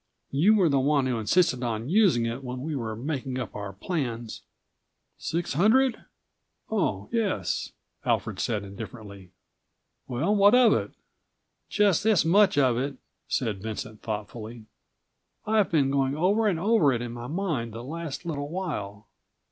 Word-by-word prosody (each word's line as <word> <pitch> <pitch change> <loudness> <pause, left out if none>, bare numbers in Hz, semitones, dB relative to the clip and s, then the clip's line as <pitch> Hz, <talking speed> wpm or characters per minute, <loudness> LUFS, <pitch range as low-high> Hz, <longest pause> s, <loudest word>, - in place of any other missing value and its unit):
"You 175 +11 +4
were 190 -5 +4
the 140 -3 +3
one 140 0 +2
who 125 -3 -1
insisted 130 - +2
on 115 -1 -2
using 175 - +3
it 115 +4 -4
when 125 0 -5
we 155 0 -3
were 115 -4 -3
making 130 +1 -4
up 130 - -5
our 100 -1 -5
plans." 120 - -4 0.8
"Six 170 0 -2
hundred? 225 - +3 0.7
Oh, 105 - -1
yes," 225 -5 -1 0.3
Alfred - - -1
said 105 -3 -1
indifferently. 100 -1 -9 0.8
"Well, 145 +12 0
what 205 +3 +6
of 250 -2 +6
it?" - - -1 0.8
"Just 205 -3 +3
this 215 -7 +3
much 195 +1 +4
of 130 -4 +3
it," 135 +1 -2 0.3
said 110 -6 -1
Vincent 110 0 -6
thoughtfully.156 110 +1 -6 0.8
"I've 215 -2 +2
been 140 -5 +2
going 135 0 +1
over 205 +7 +2
and 180 -6 +1
over 195 -6 +3
it 120 -2 -1
in 120 - -5
my 120 0 -7
mind 155 -9 -2
the 115 +1 -7
last 165 +3 -6
little 145 -3 -3
while. 105 - -4
140 Hz, 150 wpm, -26 LUFS, 115-185 Hz, 0.8 s, what